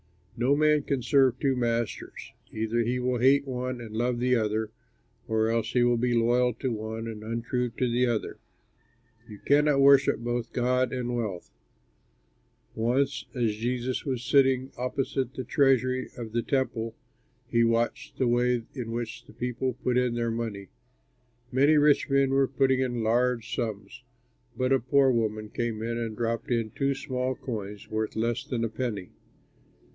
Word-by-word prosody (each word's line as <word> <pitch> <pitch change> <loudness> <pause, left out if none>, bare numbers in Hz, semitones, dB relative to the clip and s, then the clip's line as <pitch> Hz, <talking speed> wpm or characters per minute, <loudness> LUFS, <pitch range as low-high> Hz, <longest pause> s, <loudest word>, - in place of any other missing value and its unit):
"No 125 +4 +2
man 150 0 +3
can 140 -3 -2
serve 135 -2 +3
two 135 -2 +1
masters: 120 -3 -3 0.2
either 110 +1 -1
he 120 +2 +1
will 125 -1 -1
hate 135 +3 +4
one 125 -1 -3
and 110 -2 -8
love 120 +2 0
the 125 +1 +2
other, 110 -1 -1 0.6
or 110 0 +1
else 115 -1 -1
he 125 - +4
will 120 0 +3
be 120 +1 +1
loyal 120 +1 +2
to 130 +2 -2
one 110 0 -4
and 110 -2 -6
untrue 115 +2 -2
to 125 - +1
the 125 +1 +2
other. 115 -3 -2 0.9
You 105 - -9
cannot 145 0 +4
worship 140 0 +6
both 120 +1 -3
God 125 0 +1
and 125 -1 -2
wealth." 105 -7 -4 1.2
Once 130 +5 0
as 115 -4 +1
Jesus 125 +2 -2
was 130 -4 -3
sitting 130 0 +3
opposite 130 +1 -2
the 130 - -4
treasury 130 -1 +2
of 115 -3 -6
the 120 +1 0
Temple, 115 -4 -1 0.5
he 115 -1 +2
watched 115 +4 0
the 130 - +1
way 120 0 +2
in 120 -4 -5
which 115 -1 -5
the - - -16
people 125 +2 -2
put 125 - +1
in 125 -2 0
their 115 -1 -1
money. 110 -4 -4 0.8
Many 140 +4 +4
rich 145 -1 +4
men 135 -1 +3
were 135 0 +3
putting 130 0 +2
in 120 -3 -1
large 120 +1 +1
sums, 115 0 -4 0.6
but 130 +2 +2
a 135 - +4
poor 135 +2 +3
woman 110 -2 -1
came 115 -2 -3
and 115 -1 -3
dropped 115 -1 -2
in 115 -3 0
two 135 +3 0
small 130 -2 -2
coins 105 -6 -6
worth 110 0 -2
less 115 +2 -1
than 120 -2 -3
a 115 - 0
penny. 110 -6 -4
120 Hz, 165 wpm, -27 LUFS, 115-130 Hz, 1.2 s, worship